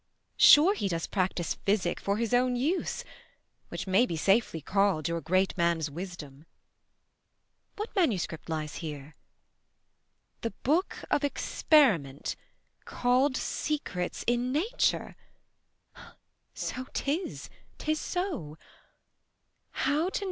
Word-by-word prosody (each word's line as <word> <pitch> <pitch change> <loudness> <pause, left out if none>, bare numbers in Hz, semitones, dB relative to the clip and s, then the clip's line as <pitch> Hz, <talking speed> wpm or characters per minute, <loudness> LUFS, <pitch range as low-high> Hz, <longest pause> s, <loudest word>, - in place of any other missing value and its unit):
Sure 320 +7 +8
he 305 - -2
does 165 -3 -2
practise 185 -3 -1
physic 195 -3 0
for 200 +1 -1
his 230 +1 -1
own 250 0 +3
use, 300 +10 -1 0.7
Which - - -5
may 195 +6 +3
be 165 - -3
safely 195 0 +2
call'd 190 -2 +1
your 170 0 -2
great 185 +4 +1
man's 170 -3 +1
wisdom. 160 -3 -8 1.3
What 425 +3 -6
manuscript 195 - 0
lies 155 -2 -3
here? 150 -2 -7 1.3
'The 230 - -1
Book 330 +9 0
of 295 0 +2
Experiment, 215 - +2 0.5
Call'd 255 +2 +1
Secrets 240 -12 -3
in 240 +1 +1
Nature'; 400 - 0 1.4
so 255 +1 -4
'tis, 315 +7 -3 0.3
'tis 310 0 -1
so; 315 - -3 1.2
25 - - -1
19. 310 +5 +1
205 Hz, 105 wpm, -29 LUFS, -, 1.4 s, Sure